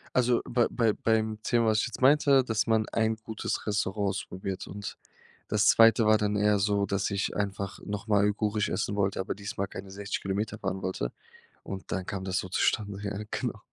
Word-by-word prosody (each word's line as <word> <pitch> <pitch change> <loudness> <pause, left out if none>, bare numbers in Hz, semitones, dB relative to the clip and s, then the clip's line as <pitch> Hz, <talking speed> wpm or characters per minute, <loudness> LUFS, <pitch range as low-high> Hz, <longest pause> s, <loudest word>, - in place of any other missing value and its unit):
Also 125 -1 +3
bei 120 -2 +2
bei 115 -3 +2
beim 110 -1 0
Thema, 120 -1 +2
was 110 0 +3
ich - - 0
jetzt 120 - -8
meinte, 140 -1 +5
dass 110 -1 0
man 110 -1 +2
ein 110 0 +1
gutes 110 0 -4
Restaurant 100 0 0
ausprobiert, 95 0 -5
und 100 +1 -7 0.5
das 105 0 +3
2. 115 0 +6
war 110 0 +6
dann 105 0 0
eher 105 0 +3
so, 100 0 +1
dass 100 +1 -1
ich 100 0 -1
einfach 100 -1 -3
nochmal 100 0 0
uigurisch 105 0 0
essen 105 - -1
wollte, 100 -2 0
aber 95 - -2
diesmal 100 -1 -4
keine 95 0 -9
60 100 0 -4
Kilometer 100 +2 -2
fahren 95 -1 -3
wollte 75 -10 -2 0.5
und 95 -1 -7
dann 95 -2 -2
kam 95 -1 -4
das 95 0 -1
so 95 - -2
zustande. 100 +2 0
Ja, 100 0 -3
genau. - - -3
105 Hz, 190 wpm, -28 LUFS, 100-110 Hz, 0.5 s, 2